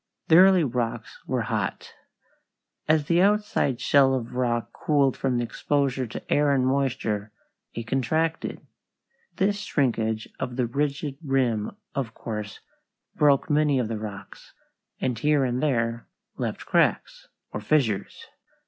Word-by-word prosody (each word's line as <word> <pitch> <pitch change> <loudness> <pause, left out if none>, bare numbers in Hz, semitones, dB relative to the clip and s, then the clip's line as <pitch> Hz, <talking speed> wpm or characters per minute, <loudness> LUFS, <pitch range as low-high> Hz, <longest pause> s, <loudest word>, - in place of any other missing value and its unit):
The 160 - +7
early 185 -1 +7
rocks 120 -3 -3
were 125 -3 0
hot. 110 -3 -3 0.9
As 155 -1 +3
the 170 +3 +3
outside 205 - +2
shell 135 -2 +4
of 120 -2 -4
rock 120 -2 -1
cooled 140 -3 +1
from 130 -3 0
exposure 130 +1 -1
to 115 - -4
air 145 0 +3
and 130 -2 +2
moisture 130 -6 -1 0.4
it 115 - -4
contracted. 155 +7 -1 0.7
This 200 +1 +1
shrinkage 115 - -1
of 125 - -4
the 125 -1 +1
rigid 140 +2 -2
rim 125 -7 0 0.2
of 125 -5 -3
course 105 -3 -6 0.5
broke 145 -2 +3
many 150 -2 +2
of 120 -4 -1
the 110 -2 -3
rocks, 105 -2 -9 0.4
and 125 -3 -1
here 145 0 +2
and 125 0 -1
there 115 -5 0 0.3
left - - -4
cracks, - - +1 0.2
or 105 - -5
fissures. 110 -5 0
130 Hz, 130 wpm, -25 LUFS, 115-145 Hz, 0.9 s, The